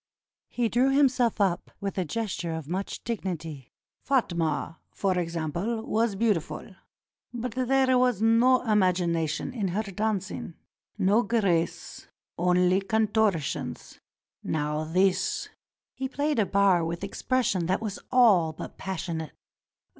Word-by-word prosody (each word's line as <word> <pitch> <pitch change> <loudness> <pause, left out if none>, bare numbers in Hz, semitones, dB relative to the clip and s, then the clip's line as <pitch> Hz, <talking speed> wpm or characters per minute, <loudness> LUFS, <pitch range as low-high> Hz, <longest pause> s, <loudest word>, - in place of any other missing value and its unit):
He 240 -1 0
drew 245 +5 +2
himself 260 -5 +3
up 190 -4 +1
with 200 -1 -4
a 185 - -1
gesture 185 -3 -3
of 160 -3 -6
much 190 +4 -4
dignity. 165 - -5 0.3
"Fatma, 165 - 0
for 195 -2 -1
example, 170 +7 -2
was 225 -2 +1
beautiful; 195 -4 -1 0.6
but 240 0 -4
there 260 +2 +2
was 250 -5 +2
no 230 +3 +4
imagination 180 - +1
in 215 -6 -1
her 195 +5 -1
danc 200 -1 -2
ing, 165 - -7 0.4
no 205 +3 +3
grace 200 -8 -1
— - - -68
only 180 +2 +3
contortions. 195 - -1 0.4
Now 150 0 -1
this 185 +3 +1
— - - -68
" - - -67
He 265 0 -3
played 290 -1 0
a 205 - +2
bar 195 -3 +3
with 170 +1 -4
expression 220 -10 0
that 185 - +1
was 215 -3 -5
all 205 -11 +5
but - - -9
passion 175 -3 -3
ate. 155 - -8
195 Hz, 135 wpm, -27 LUFS, 170-230 Hz, 0.6 s, all